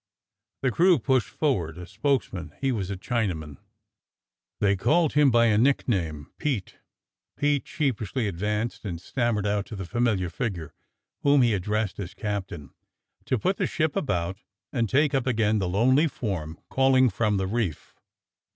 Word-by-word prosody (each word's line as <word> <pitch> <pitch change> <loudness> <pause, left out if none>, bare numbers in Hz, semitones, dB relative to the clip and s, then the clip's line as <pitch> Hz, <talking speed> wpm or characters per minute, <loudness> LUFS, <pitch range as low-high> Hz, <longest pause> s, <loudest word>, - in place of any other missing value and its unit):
The 130 - +2
crew 175 +5 +5
pushed 130 -2 +1
forward 90 - -1
a 90 - -7
spokesman: 100 - -2
he 135 -1 +1
was 100 -6 -2
a 100 - -3
Chinaman 90 - -2 0.5
— - - -66
they 100 -1 +3
called 160 - +2
him 145 -1 +5
by 120 -1 +4
a 110 -2 +3
nickname 95 - 0
— - - -56
Pete. 130 - -2 0.6
Pete 145 -1 +1
sheepishly 130 - -1
advanced 105 +5 -2
and 90 -6 -4
stammered 115 +1 -1
out 105 0 0
to 110 - -7
the 95 -2 -5
familiar 105 -4 0
figure, 85 - -4 0.5
whom 140 -2 +5
he 120 -2 +3
addressed 105 +1 -1
as 95 -2 -6
"Captain," 95 -9 -4 0.5
to 130 - +1
put 185 - 0
the - - 0
ship 155 -2 -1
about, 90 - -1 0.3
and 115 -4 0
take 145 +2 +3
up 135 -2 0
again 110 -3 +2
the 95 -2 -1
lonely 130 - +4
form 90 - -4
calling 130 -1 +4
from 105 +1 +1
the 95 - 0
reef. 100 -5 -3
110 Hz, 160 wpm, -26 LUFS, 95-130 Hz, 0.6 s, crew